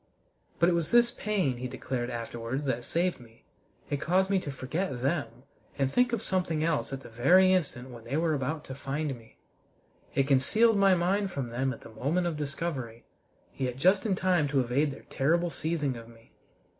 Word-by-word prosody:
But 170 - +4
it - - +4
was 170 -2 0
this 240 0 +5
pain, 190 -12 -1
he 125 +1 -4
declared 125 -1 -4
afterwards, 120 +3 -4
that 120 -3 -1
saved 175 +6 0
me: 115 -2 -17 0.4
it 145 0 -2
caused 190 +4 +2
me 195 - +3
to 145 - -5
forget 135 0 -3
them 135 -4 -2 0.3
and 135 -1 +1
think 250 - +3
of 230 -2 -1
something 180 -6 0
else 160 -4 0
at 135 0 -5
the - - -11
very 180 +12 +5
instant 130 -8 -1
when 120 -2 -10
they 135 +5 -2
were 160 -1 +1
about 150 +2 -2
to 130 - -7
find 140 +2 -3
me. 115 -2 -18 0.8
It 135 - +2
concealed 215 - +4
my 195 -1 +6
mind 190 +3 +1
from 135 -8 -4
them 130 +3 -1
at 120 - -8
the - - -12
moment 145 +11 -1
of 170 -2 -1
discovery, 140 -5 -4 0.5
yet 125 -2 -2
just 185 +7 +4
in 210 -5 +1
time 180 -5 +2
to 140 -1 +1
evade 130 +5 +1
their 140 - -9
terrible 170 +5 +1
seizing 150 -5 -1
of 115 -1 -9
me. 115 0 -19
145 Hz, 195 wpm, -29 LUFS, 125-180 Hz, 0.8 s, my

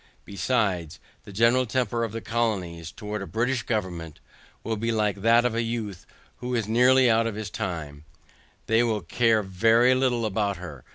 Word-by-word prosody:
Besides, 100 -7 -1 0.3
the - - -10
general 115 +5 +3
temper 120 0 -1
of 115 - -3
the 115 +1 -5
colonies, 95 -9 -2
towards 105 -1 -6
a - - -8
British 120 +2 0
government, 90 -9 -4 0.4
will 110 +1 -2
be 115 +2 -2
like 105 -3 0
that 115 +3 +4
of 125 - +1
a 115 - 0
youth, 115 -5 -4 0.3
who 125 +1 -3
is 115 -3 -1
nearly 125 +3 +5
out 115 0 +3
of 115 - -4
his 110 -1 -5
time; 75 -5 -5 0.6
they 110 +2 +3
will 110 -3 0
care 110 +5 +2
very 115 +6 +3
little 125 -3 +1
about 100 -2 -1
her. 75 -8 -9
110 Hz, 175 wpm, -25 LUFS, 100-120 Hz, 0.6 s, nearly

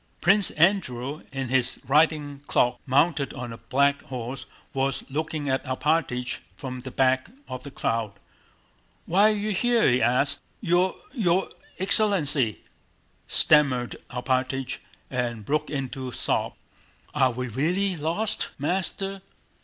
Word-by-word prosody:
Prince 195 +2 +5
Andrew 155 -6 +1
in 135 -2 -4
his 130 -1 +1
riding 150 0 +2
cloak, 125 - +2
mounted 140 +2 +2
on 120 -2 -6
a 115 - -10
black 140 +5 +1
horse, 125 +1 -6 0.3
was 135 0 0
looking 155 0 -3
at 130 0 0
Alpátych 130 -2 -1 0.2
from 130 -2 -6
the 130 +1 -7
back 130 +4 +1 0.2
of 130 - -6
the 140 - -8
crowd. 115 -5 -2 0.9
"Why 200 +5 +4
are 215 - +1
you 210 +1 -2
here?" 235 +3 +3
he 125 0 +3
asked. 140 +3 +2 0.2
"Your... 180 -1 +2 0.2
your 190 -8 +1 0.3
excellency," 165 - +3 0.6
stammered 140 -5 +4
Alpátych 130 +1 -1 0.3
and 120 -4 -2
broke 150 +4 0
into 135 -2 -4
sobs. - - -1 0.6
"Are 135 -3 +3
we 125 +1 -4
really 175 - 0
lost? 175 +8 -1
Master!..." 190 +5 -2
140 Hz, 125 wpm, -25 LUFS, 130-175 Hz, 0.9 s, Prince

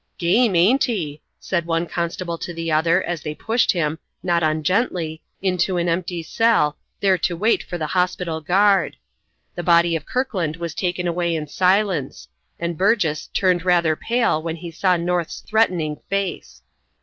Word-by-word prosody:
"Game, 190 +4 +3
ain't 215 +12 +4
he?" 160 - -3 0.2
said 170 -3 -2
one 165 0 0
constable 170 0 -3
to 175 - -6
the 165 -1 -3
other, 165 +4 +3
as 175 -3 -3
they 150 0 -5
pushed 225 +9 +1
him, 160 -3 -1 0.2
not 175 -2 +1
ungently, 160 - 0 0.2
into 185 -1 +1
an 175 0 0
empty 170 0 -2
cell, 160 -5 +2 0.3
there 190 -2 +3
to 175 0 -1
wait 220 +6 +2
for 175 - -6
the 155 - -2
hospital 180 -1 -1
guard. 195 +5 +3 0.6
The 175 - -4
body 170 0 +4
of 155 - -5
Kirkland 200 - -1
was 170 -1 -5
taken 180 0 -2
away 170 0 0
in 155 -1 -3
silence, 180 - 0 0.3
and 170 -1 -3
Burgess 185 -7 +1
turned 180 -3 +1
rather 170 -3 +3
pale 230 -5 0
when 165 0 -3
he 170 0 -8
saw 180 +2 +2
North's 175 -1 -2
threatening 180 -9 +1
face. 195 -1 -3
175 Hz, 160 wpm, -21 LUFS, 160-185 Hz, 0.6 s, ain't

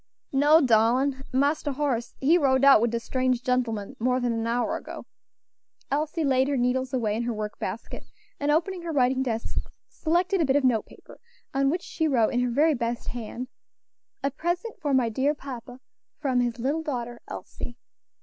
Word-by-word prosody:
"No, 295 +4 +5
darlin', 255 +3 +3
Marster 285 +2 +1
Horace 260 -4 -2
he 295 +6 +4
rode 275 -5 +3
out 275 -5 +8
wid 235 - +2
de 235 +1 -1
strange 255 +1 0
gentlemen 245 -2 -1
more 250 +2 +1
than 245 -2 0
an 225 0 -2
hour 240 +1 0
ago." - - -8 0.9
Elsie 310 +3 0
laid 265 -2 +3
her 285 -1 0
needles 255 +1 0
away 225 -5 0
in 225 - -1
her 240 0 -1
work 210 0 -5
basket, - - -5 0.3
and 285 - -1
opening 345 +4 +1
her 340 -1 -4
writing 260 -2 +2
desk, 230 -3 -2 0.3
selected 350 +3 0
a - - +3
bit 270 0 +2
of 285 - +3
note 240 -4 +2
paper, - - -16 0.3
on 275 0 +2
which 350 +4 -1
she 320 -1 -1
wrote 235 -7 +2
in 245 - +2
her 250 0 +1
very 300 +6 +3
best 235 -2 -3
hand, 245 +1 -6 0.8
"A 275 - +1
present 345 - -2
for 295 -2 -1
my 260 -3 +3
dear 265 +7 +1
papa, 250 -3 -8 0.4
from 265 -4 0
his 240 -2 0
little 275 +7 -1
daughter 240 -6 -4
Elsie!" 240 0 -8
260 Hz, 185 wpm, -26 LUFS, 240-290 Hz, 0.9 s, out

